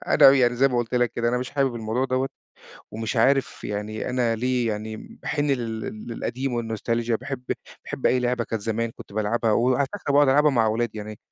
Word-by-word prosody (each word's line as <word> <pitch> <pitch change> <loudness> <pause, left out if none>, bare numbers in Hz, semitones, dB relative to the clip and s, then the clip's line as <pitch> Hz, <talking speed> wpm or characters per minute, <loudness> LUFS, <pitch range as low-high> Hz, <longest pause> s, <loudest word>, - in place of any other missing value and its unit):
أنا 135 - +8
يعني 125 -3 +3
زي 135 +2 +4
ما 125 - -1
قُلت 120 0 -2
لك 120 -1 +2
كده 120 0 0
أنا 125 +1 +1
مش 125 - -4
حابب 135 -4 +1
الموضوع 115 +3 -1
دوّة 130 +1 0 0.6
ومش 110 +3 -3
عارف 135 +4 +2
يعني 105 +3 -3
أنا 120 -2 +1
ليه 125 0 0
يعني 110 +1 -3 0.3
باحِن 145 -1 -1
لل 115 -4 -1 0.3
للقديم 125 +3 -3
والنوستالجيا 115 +1 -1
وباحب 130 +2 -4 0.4
باحب - - -2
أي 125 - +3
لعبة 125 -1 0
كان 115 - -3
زمان 115 +2 -2
كنت - - -12
بالعبها 110 +2 +1
وعلى 125 +5 +2
فكرة 195 -8 -3
باقعد 145 0 +5
ألعبها 150 +3 +5
مع 115 -4 +3
أولادي. 110 0 -1
يعني 105 0 -7
120 Hz, 195 wpm, -24 LUFS, 110-130 Hz, 0.6 s, أنا